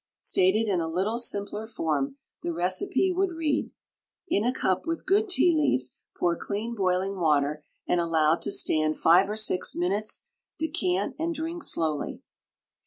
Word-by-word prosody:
Stated 205 +5 +2
in 185 -4 +1
a 165 - -2
little 195 +8 -1
simpler 210 -1 -1
form 230 - -2 0.2
the 175 - -2
recipe 185 - +1
would 370 0 0
read: 310 -3 -1 0.6
In 205 - +1
a 245 - +2
cup 190 - -1
with 330 0 -3
good 415 +2 +2
tea 360 -2 +4
leaves 130 - +1 0.2
pour 175 -1 +1
clean 210 +6 -4
boiling 190 -1 0
water 150 -2 +1 0.2
and 175 - +2
allow 160 -2 +3
to - - -3
stand 155 0 +1
five 180 +4 +5
or 210 - -2
six 215 -4 +2
minutes; 200 +5 -1 0.3
decant 200 - -1
and 335 +1 -1
drink 330 +2 -4
slowly. 155 - -1
195 Hz, 155 wpm, -27 LUFS, 170-275 Hz, 0.6 s, five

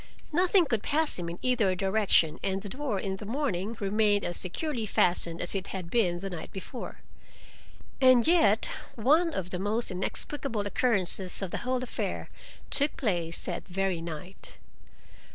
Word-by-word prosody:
Nothing 360 +2 +4
could 225 -7 0
pass 305 - 0
him 170 -1 -3
in 170 - -6
either 230 -7 +2
direction, 190 -4 +2
and 195 0 0
the 205 - -5
door 260 -4 -2
in 190 0 -3
the 205 - -8
morning 225 -5 -2
remained 205 0 +2
as 175 - -2
securely 230 - -1
fastened 175 -3 +2
as 175 - -3
it 195 -1 -3
had 180 -3 -6
been 180 -7 +2
the 195 - -4
night 170 -3 -7
before. 200 +6 -7 1.0
And 255 -2 +6
yet 225 - +4 0.3
one 305 +9 +3
of 185 - -4
the 180 - -1
most 210 +3 -1
inexplicable 225 +5 -2
occurrences 200 -3 0
of 185 - -3
the - - -2
whole 255 0 -1
affair 255 - -3 0.4
took 285 +1 +3
place 170 -8 -1
that - - -4
very 190 -2 -1
night. 170 +3 -8
205 Hz, 160 wpm, -29 LUFS, 185-255 Hz, 1.0 s, And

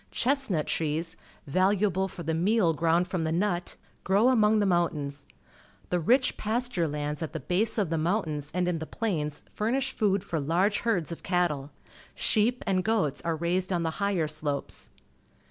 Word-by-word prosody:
Chestnut 255 - +1
trees, 160 +1 -2 0.3
valuable 190 +4 +2
for 175 - -9
the 160 +1 -1
meal 180 +1 +2
ground 165 +3 +2
from 180 -2 -2
the 160 - -1
nut, 175 0 -1 0.3
grow 200 +6 +4
among 220 -4 +4
the 210 - +2
mountains. 150 -6 0 0.6
The 180 - +2
rich 250 - +2
pasture 220 -5 0
lands 150 0 -3
at 160 - -4
the 160 - -3
base 190 - 0
of 195 -7 0
the 165 - +1
mountains 155 -4 -1
and 180 +1 0
in 175 -2 0
the 160 - -6
plains 155 -10 -3
furnish 260 +5 0
food 200 -5 +1
for 165 -5 -2
large 175 +8 +1
herds 185 -9 0
of 170 - -6
cattle. 170 -6 0 0.5
Sheep 235 +3 +2
and 190 -3 +1
goats 200 -10 0
are 165 -1 -1
raised 180 +3 -1
on 175 -2 0
the 160 -1 -1
liigher 195 -6 +1
slopes. 150 -2 -3
180 Hz, 170 wpm, -28 LUFS, 160-210 Hz, 0.6 s, grow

